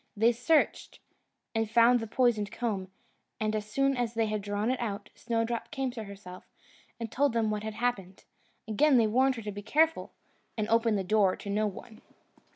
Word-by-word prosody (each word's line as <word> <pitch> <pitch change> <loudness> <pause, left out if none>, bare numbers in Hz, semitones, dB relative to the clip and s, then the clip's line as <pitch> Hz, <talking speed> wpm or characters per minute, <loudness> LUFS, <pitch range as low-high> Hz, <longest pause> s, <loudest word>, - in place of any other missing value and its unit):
They 225 +3 +5
searched, 250 +7 +1 0.6
and 225 -1 0
found 235 +2 +5
the 225 - -5
poisoned 220 -3 +1
comb; 215 -6 -3 0.5
and 215 0 0
as 215 0 -4
soon 275 +4 +1
as 240 -2 -2
they 225 0 +2
had 215 -1 -2
drawn 205 +3 -1
it 260 - -2
out, 205 -3 -4
Snowdrop 230 0 -2
came 270 -3 -2
to 225 -3 -7
herself, 195 -2 -11 0.5
and 230 -2 -5
told 280 -1 +1
them 225 -2 +1
what 210 -1 -2
had 215 0 -5
happened. 210 -6 -3 0.4
Again 260 +6 +4
they 230 - +4
warned 260 +5 +2
her 230 - -7
to 210 - -4
be 205 +1 -7
careful, 315 +9 +1 0.5
and 215 -1 -1
open 230 -1 +3
the 195 - -1
door 195 0 +3
to 200 - -7
no 210 +1 +1
one. 220 +3 -10
225 Hz, 190 wpm, -29 LUFS, 210-245 Hz, 0.6 s, They